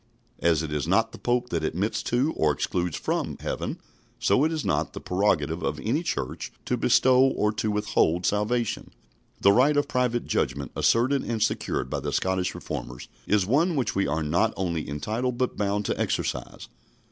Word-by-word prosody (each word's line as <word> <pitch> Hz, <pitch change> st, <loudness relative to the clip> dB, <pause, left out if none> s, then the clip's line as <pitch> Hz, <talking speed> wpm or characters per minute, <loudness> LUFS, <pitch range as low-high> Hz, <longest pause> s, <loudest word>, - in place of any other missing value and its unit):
" 120 Hz, +2 st, -37 dB
As 80 Hz, 0 st, +1 dB
it 75 Hz, -1 st, -4 dB
is 75 Hz, 0 st, -1 dB
not 115 Hz, +5 st, +2 dB
the -, -, -11 dB
Pope 125 Hz, 0 st, 0 dB
that 85 Hz, -2 st, -1 dB
admits 90 Hz, +7 st, -1 dB
to, 130 Hz, +6 st, 0 dB
or 75 Hz, -1 st, +2 dB
excludes 85 Hz, +3 st, -2 dB
from, -, -, -2 dB
heaven, -, -, -3 dB, 0.4 s
so 135 Hz, -, +3 dB
it 160 Hz, -, +2 dB
is 155 Hz, -3 st, -3 dB
not -, -, 0 dB
the -, -, -6 dB
prerogative 90 Hz, -4 st, 0 dB
of -, -, -2 dB
any -, -, 0 dB
church -, -, -3 dB
to -, -, 0 dB
bestow 130 Hz, 0 st, +4 dB
or 130 Hz, -5 st, +3 dB
to 110 Hz, 0 st, -2 dB
withhold 105 Hz, -4 st, +1 dB
salvation. 105 Hz, +2 st, 0 dB, 0.5 s
The 100 Hz, -, +6 dB
right 135 Hz, +7 st, +4 dB
of 145 Hz, -, +2 dB
private 125 Hz, -2 st, 0 dB
judgment, 70 Hz, +2 st, -1 dB
asserted 130 Hz, +4 st, +3 dB
and 115 Hz, -2 st, -2 dB
secured 105 Hz, -10 st, -1 dB
by 70 Hz, -, -1 dB
the 70 Hz, +1 st, -3 dB
Scottish 95 Hz, +3 st, 0 dB
Reformers, 60 Hz, 0 st, -6 dB, 0.2 s
is 105 Hz, -2 st, +3 dB
one 155 Hz, -, +2 dB
which 125 Hz, -6 st, 0 dB
we 95 Hz, 0 st, +1 dB
are 80 Hz, +2 st, -1 dB
not 85 Hz, +9 st, +1 dB
only 85 Hz, -4 st, -2 dB
entitled 115 Hz, -, -2 dB
but 125 Hz, 0 st, -1 dB
bound 105 Hz, 0 st, -1 dB
to -, -, -2 dB
exercise. -, -, -3 dB
105 Hz, 185 wpm, -26 LUFS, 85-125 Hz, 0.5 s, The